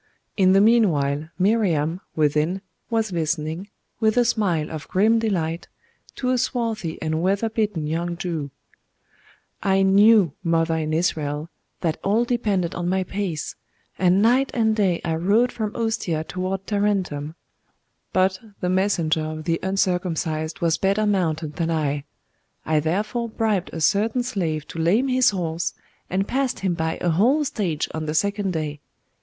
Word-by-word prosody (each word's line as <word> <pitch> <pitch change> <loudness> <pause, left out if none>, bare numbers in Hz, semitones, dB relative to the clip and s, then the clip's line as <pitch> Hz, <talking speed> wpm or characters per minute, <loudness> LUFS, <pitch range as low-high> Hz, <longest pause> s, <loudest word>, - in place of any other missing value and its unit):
In 185 -2 +4
the 195 - +6
meanwhile, 160 -10 +3
Miriam, 180 -5 +1
within, 155 +4 +1 0.3
was 225 -3 0
listening, 160 +2 -2 0.3
with 220 +1 +2
a 245 - +5
smile 185 -9 0
of 155 -2 -6
grim 220 +4 +3
delight, 170 -7 -1 0.5
to 255 -1 -1
a 255 - +2
swarthy 225 -9 -2
and 160 0 -1
weather 200 +5 +1
beaten 210 -8 -1
young 170 +3 -2
Jew. 165 -5 -3 1.1
'I 195 -1 +3
knew, 200 -3 +5
mother 165 -1 +1
in 155 -1 -2
Israel, 155 -2 -1 0.3
that 160 -3 -1
all 215 +5 +2
depended 205 -8 0
on 175 0 -2
my 190 0 +1
pace; 185 -5 -4 0.4
and 185 +2 +4
night 255 +4 +4
and 220 -2 +2
day 190 -5 +1
I 160 -1 0
rode 210 +9 +3
from 215 -2 -4
Ostia 220 -9 -1
toward 185 +3 -4
Tarentum: 190 -8 -1 0.8
but 190 0 +2 0.2
the 180 - -1
messenger 185 -4 +1
of 155 0 -5
the 165 0 0
uncircumcised 180 -4 -1
was 165 -1 +2
better 200 +2 +2
mounted 160 -7 0
than 165 -1 0
I; 145 -3 -1 0.6
I 155 -1 +2
therefore 210 +9 -1
bribed 215 -5 0
a 165 - -5
certain 220 +8 +2
slave 165 - -2
to 165 - -6
lame 205 +12 +2
his 255 0 +4
horse, 170 -4 -2 0.3
and 195 +2 0
passed 265 -1 -1
him 190 -2 +1
by 160 -1 -2
a 175 - +2
whole 250 - +3
stage 195 - -1
on 160 -1 -4
the 155 - -2
second 200 +1 0
day. 150 -2 -3
185 Hz, 150 wpm, -23 LUFS, 160-210 Hz, 1.1 s, the